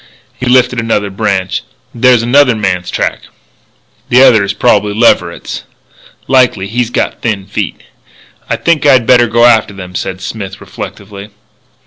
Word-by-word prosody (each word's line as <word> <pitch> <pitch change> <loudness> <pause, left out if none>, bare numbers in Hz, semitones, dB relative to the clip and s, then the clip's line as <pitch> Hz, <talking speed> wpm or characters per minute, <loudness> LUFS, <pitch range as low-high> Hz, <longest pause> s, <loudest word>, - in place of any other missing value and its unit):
He 130 - -6
lifted 125 0 +2
another 105 -3 -1
branch. 95 -3 -2 0.3
"There's 120 -1 +3
another 125 0 +3
man's 90 -4 -2
track!" - - -3 0.8
"The 125 +2 +5
other 110 -6 +5
is 100 - -1
probably 105 -3 +1
Leverett's." 90 -6 0 0.7
"Likely. 125 -7 +2
He's 115 +3 -2
got - - -2
thin 105 -5 -2
feet." - - -5 0.7
"I - - +1
think 170 -3 0
I'd 130 -5 +4
better 120 0 +4
go 120 +1 +3
after 110 -4 +3
them," 90 -1 -9
said 95 +1 -4
Smith, 95 0 -7
reflectively. 100 0 -9
110 Hz, 140 wpm, -12 LUFS, 100-125 Hz, 0.8 s, The